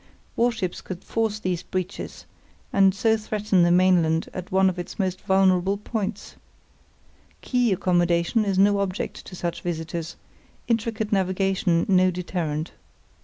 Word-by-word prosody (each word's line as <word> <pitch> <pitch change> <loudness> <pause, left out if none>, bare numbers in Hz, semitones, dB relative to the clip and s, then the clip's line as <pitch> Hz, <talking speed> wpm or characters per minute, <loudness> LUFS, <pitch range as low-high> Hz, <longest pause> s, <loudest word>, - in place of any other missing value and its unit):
Warships 225 -7 0
could 185 -1 -8
force 225 -2 -1
these 185 -4 -2
breaches, 185 +1 -5 0.5
and 195 -1 +4
so 220 +2 +3
threaten 210 -3 0
the 175 - +4
mainland 175 -3 +3
at 180 -1 -7
one 190 0 +4
of 185 -1 -1
its 175 - -6
few 190 -2 0
vulnerable 190 +1 +2
points. 210 -1 -5 1.1
Quay 245 -3 +1
accommodation 175 +3 +2
is 195 -2 -1
no 200 +1 +4
object 195 -1 -3
to 185 - -9
such 175 -1 -4
visitors; 165 -1 -4 0.5
intricate 225 -2 -1
navigation 190 -3 +1
no 185 -1 +4
deterrent. 170 -3 -3
185 Hz, 130 wpm, -24 LUFS, 175-205 Hz, 1.1 s, and